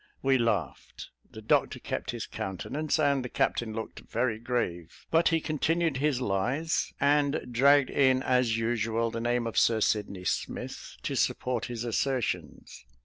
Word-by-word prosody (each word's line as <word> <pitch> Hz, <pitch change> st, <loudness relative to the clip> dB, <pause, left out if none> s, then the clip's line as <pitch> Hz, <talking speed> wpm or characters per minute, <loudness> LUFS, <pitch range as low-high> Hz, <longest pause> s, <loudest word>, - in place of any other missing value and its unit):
We 135 Hz, -1 st, +3 dB
laughed; 115 Hz, -1 st, -2 dB, 0.2 s
the -, -, -11 dB
doctor -, -, +2 dB
kept -, -, -5 dB
his -, -, -3 dB
countenance; 140 Hz, -, -3 dB
and 140 Hz, -3 st, +2 dB
the 125 Hz, -, -5 dB
captain 110 Hz, -2 st, -1 dB
looked 110 Hz, -, -6 dB
very 115 Hz, -2 st, -2 dB
grave; 110 Hz, -9 st, -3 dB
but 165 Hz, +1 st, +4 dB
he 165 Hz, -1 st, +3 dB
continued 160 Hz, 0 st, 0 dB
his 140 Hz, -2 st, +1 dB
lies, 125 Hz, +9 st, 0 dB
and 145 Hz, +1 st, +3 dB
dragged 140 Hz, +2 st, +4 dB
in 130 Hz, -1 st, +3 dB
as 125 Hz, -3 st, +2 dB
usual 115 Hz, 0 st, 0 dB
the 115 Hz, 0 st, -4 dB
name 120 Hz, 0 st, 0 dB
of 115 Hz, -, +1 dB
Sir 115 Hz, -1 st, +3 dB
Sydney 100 Hz, -3 st, 0 dB
Smith -, -, -4 dB
to -, -, -2 dB
support 125 Hz, -3 st, 0 dB
his 120 Hz, -2 st, -5 dB
assertions. 120 Hz, -, -2 dB
125 Hz, 150 wpm, -28 LUFS, 115-140 Hz, 0.2 s, but